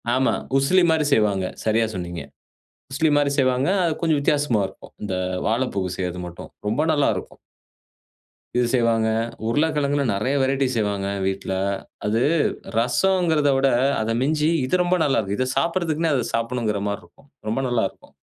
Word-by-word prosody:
ஆமா, 130 Hz, +1 st, +2 dB, 0.2 s
உசிலி 175 Hz, +7 st, +3 dB
மாதிரி 160 Hz, -2 st, +2 dB
செய்வாங்க. 100 Hz, -5 st, +2 dB, 0.2 s
சரியா 110 Hz, +1 st, +2 dB
சொன்னீங்க. 85 Hz, -2 st, -5 dB, 0.7 s
உசிலி 155 Hz, +3 st, +2 dB
மாதிரி 145 Hz, -1 st, +2 dB
செய்வாங்க. 130 Hz, +1 st, +2 dB, 0.2 s
அது 165 Hz, -, +1 dB
கொஞ்சம் 160 Hz, -3 st, +2 dB
வித்தியாசமா 145 Hz, -6 st, +1 dB
இருக்கும். -, -, -15 dB
இந்த 95 Hz, -3 st, -2 dB, 0.3 s
வாழைப்பூ 115 Hz, -3 st, 0 dB, 0.2 s
செய்றது 90 Hz, -1 st, -3 dB
மட்டும் 85 Hz, -1 st, -10 dB, 0.2 s
ரொம்ப 130 Hz, +8 st, +1 dB
நல்லா 145 Hz, -2 st, +2 dB
இருக்கும். -, -, -8 dB, 1.2 s
இது 125 Hz, -, +3 dB
செய்வாங்க. 115 Hz, -3 st, +2 dB, 0.4 s
உருளைக்கெழங்குல 145 Hz, +2 st, +1 dB
நெறைய 125 Hz, +8 st, 0 dB
வெரைய்ட்டி 135 Hz, 0 st, +1 dB
செய்வாங்க 100 Hz, -3 st, -1 dB, 0.2 s
வீட்ல. 95 Hz, 0 st, -3 dB, 0.5 s
அது 110 Hz, +3 st, +1 dB, 0.6 s
ரசம்ங்கிறத 160 Hz, +4 st, +2 dB
விட 135 Hz, 0 st, +3 dB, 0.3 s
அத 110 Hz, +1 st, -1 dB
மிஞ்சி 150 Hz, +3 st, +1 dB, 0.2 s
இது 180 Hz, +8 st, +1 dB
ரொம்ப 175 Hz, +1 st, +2 dB
நல்லா 135 Hz, -4 st, +2 dB
இருக்கும். 100 Hz, -1 st, -2 dB
இதை 130 Hz, -, +1 dB
சாப்ட்றதுக்குனே 165 Hz, -2 st, 0 dB
அத 125 Hz, -3 st, 0 dB
சாப்பிடணும்ங்கிற 115 Hz, -3 st, -1 dB
மாரி 100 Hz, -, -4 dB
இருக்கும்.ரொம்ப 115 Hz, +4 st, -7 dB
நல்லா 120 Hz, -2 st, +1 dB
இருக்கும். -, -, -22 dB
130 Hz, 145 wpm, -23 LUFS, 110-150 Hz, 1.2 s, உசிலி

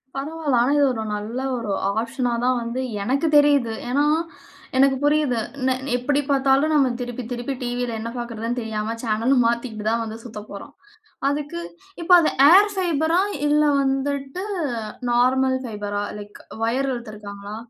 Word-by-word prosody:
பரவால்ல. 295 Hz, -1 st, -2 dB
ஆனா 255 Hz, +4 st, +2 dB
இது 290 Hz, -, +4 dB
ஒரு 220 Hz, -1 st, -3 dB
நல்ல 220 Hz, +5 st, -4 dB, 0.2 s
ஒரு 220 Hz, -4 st, -4 dB, 0.3 s
ஆஃப்ஷனா 240 Hz, +1 st, -2 dB
தான் 255 Hz, 0 st, +2 dB
வந்து 235 Hz, +3 st, -3 dB, 0.2 s
எனக்கு 275 Hz, +8 st, 0 dB
தெரியுது. 285 Hz, -6 st, +4 dB, 0.2 s
ஏன்னா, 285 Hz, +3 st, +2 dB, 0.7 s
எனக்கு 270 Hz, 0 st, +5 dB
புரியுது. 290 Hz, -5 st, +2 dB, 0.3 s
நெ 260 Hz, -, +3 dB, 0.2 s
எப்பிடி 280 Hz, +4 st, +1 dB
பார்த்தாலும் 275 Hz, +3 st, +3 dB
நம்ம 270 Hz, -4 st, +3 dB
திருப்பி 245 Hz, 0 st, -5 dB
திருப்பி 245 Hz, +3 st, -3 dB
டிவில 245 Hz, -1 st, -2 dB
என்ன 230 Hz, +1 st, -4 dB
பாக்குறதுன்னு 235 Hz, +1 st, -3 dB
தெரியாம 220 Hz, 0 st, -3 dB
சேனல 230 Hz, +4 st, +1 dB
மாத்திக்கிட்டு 235 Hz, -2 st, -2 dB
தான் 230 Hz, +1 st, 0 dB
வந்து 220 Hz, 0 st, -6 dB
சுத்தப்போறோம். 210 Hz, +3 st, -9 dB, 0.6 s
அதுக்கு 295 Hz, +4 st, -3 dB, 0.4 s
இப்ப 340 Hz, -, -2 dB
அத 320 Hz, -, +2 dB, 0.2 s
ஏர் 410 Hz, +3 st, +7 dB
ஃபைபரா 335 Hz, -1 st, +1 dB, 0.3 s
இல்ல 300 Hz, +1 st, +3 dB, 0.2 s
வந்துட்டு 275 Hz, +4 st, -2 dB, 0.7 s
நார்மல் 260 Hz, +2 st, +3 dB
ஃபைபரா 205 Hz, -2 st, -4 dB, 0.2 s
லைக் 205 Hz, 0 st, -11 dB, 0.2 s
வயர் 265 Hz, +4 st, 0 dB
இழுத்துருக்காங்களா? 210 Hz, -3 st, -8 dB
250 Hz, 140 wpm, -22 LUFS, 230-280 Hz, 0.7 s, ஏர்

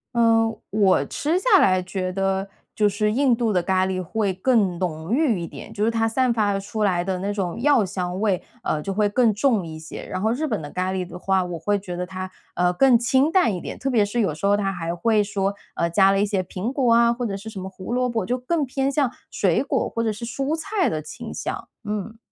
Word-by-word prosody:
嗯， 225 Hz, -1 st, +4 dB, 0.2 s
我 200 Hz, -2 st, +3 dB
吃 320 Hz, +5 st, -1 dB
下 405 Hz, -2 st, +5 dB
来 185 Hz, -1 st, +4 dB
觉 185 Hz, 0 st, -3 dB
得 195 Hz, +1 st, -1 dB, 0.3 s
就 210 Hz, -1 st, +3 dB
是 210 Hz, +1 st, 0 dB
印 265 Hz, +1 st, +3 dB
度 230 Hz, -2 st, 0 dB
的 180 Hz, -, +2 dB
咖 185 Hz, +1 st, +2 dB
喱 185 Hz, -1 st, -2 dB
会 205 Hz, +2 st, -1 dB
更 195 Hz, -2 st, +2 dB
浓 170 Hz, +1 st, -3 dB
郁 260 Hz, -, +2 dB
一 170 Hz, -, -4 dB
点， 220 Hz, -, -10 dB
就 210 Hz, 0 st, 0 dB
是 230 Hz, -, +2 dB
它 225 Hz, 0 st, +1 dB
散 250 Hz, +2 st, +1 dB
发 205 Hz, -3 st, +1 dB
出 215 Hz, +2 st, -3 dB
来 185 Hz, -4 st, +2 dB
的 185 Hz, +1 st, -2 dB
那 200 Hz, +2 st, -2 dB
种 190 Hz, -1 st, -3 dB
药 270 Hz, -7 st, +4 dB
香 180 Hz, 0 st, -3 dB
味， 200 Hz, -4 st, +1 dB, 0.2 s
呃， 150 Hz, -, -1 dB
就 195 Hz, +4 st, -3 dB
会 210 Hz, +1 st, +2 dB
更 225 Hz, +1 st, +3 dB
重 215 Hz, -3 st, +1 dB
一 155 Hz, -1 st, -8 dB
些。 160 Hz, -, -8 dB
然 185 Hz, -, -4 dB
后 220 Hz, -, +2 dB
日 290 Hz, +6 st, -1 dB
本 220 Hz, -, -2 dB
的 145 Hz, -, -7 dB
咖 185 Hz, +1 st, -1 dB
喱 185 Hz, -1 st, -2 dB
的 180 Hz, 0 st, -9 dB
话， 190 Hz, 0 st, +1 dB
我 175 Hz, -1 st, -5 dB
会 205 Hz, +4 st, 0 dB
觉 180 Hz, -3 st, -6 dB
得 180 Hz, +1 st, -3 dB
它， 185 Hz, 0 st, -6 dB, 0.3 s
呃， 180 Hz, 0 st, +2 dB
更 255 Hz, +3 st, +5 dB
清 265 Hz, +5 st, +2 dB
淡 355 Hz, -, +3 dB
一 175 Hz, -, -5 dB
点， -, -, -7 dB
特 270 Hz, -, -1 dB
别 235 Hz, -5 st, +3 dB
是 205 Hz, +4 st, -2 dB
有 195 Hz, -9 st, +1 dB
时 160 Hz, -, -4 dB
候 200 Hz, +1 st, +4 dB
它 195 Hz, -1 st, -1 dB
还 170 Hz, -1 st, -3 dB
会 215 Hz, +3 st, +2 dB
说， 200 Hz, -1 st, -1 dB, 0.2 s
呃， 170 Hz, -, 0 dB
加 195 Hz, +3 st, +5 dB
了 195 Hz, -, +2 dB
一 -, -, +3 dB
些 200 Hz, -3 st, -1 dB
苹 190 Hz, +8 st, -4 dB
果 250 Hz, -5 st, +3 dB
啊， 235 Hz, 0 st, +5 dB
或 245 Hz, +1 st, -3 dB
者 200 Hz, -3 st, -3 dB
是 220 Hz, +3 st, -8 dB
什 215 Hz, -, -10 dB
么 190 Hz, -, -5 dB
胡 190 Hz, +4 st, -7 dB
萝 250 Hz, 0 st, +1 dB
卜， 225 Hz, -5 st, -1 dB
就 250 Hz, +6 st, -1 dB
更 295 Hz, +4 st, -1 dB
偏 270 Hz, +1 st, -1 dB
向 280 Hz, -2 st, +1 dB, 0.2 s
水 -, -, +1 dB
果 -, -, 0 dB
或 230 Hz, -, -2 dB
者 220 Hz, -, +1 dB
是 225 Hz, +3 st, -6 dB
蔬 275 Hz, +6 st, -2 dB
菜 375 Hz, +3 st, 0 dB
的 155 Hz, -, -2 dB
清 -, -, -8 dB
香。 -, -, -5 dB, 0.2 s
嗯。 210 Hz, +1 st, -4 dB
205 Hz, 270 characters per minute, -23 LUFS, 185-235 Hz, 0.3 s, 下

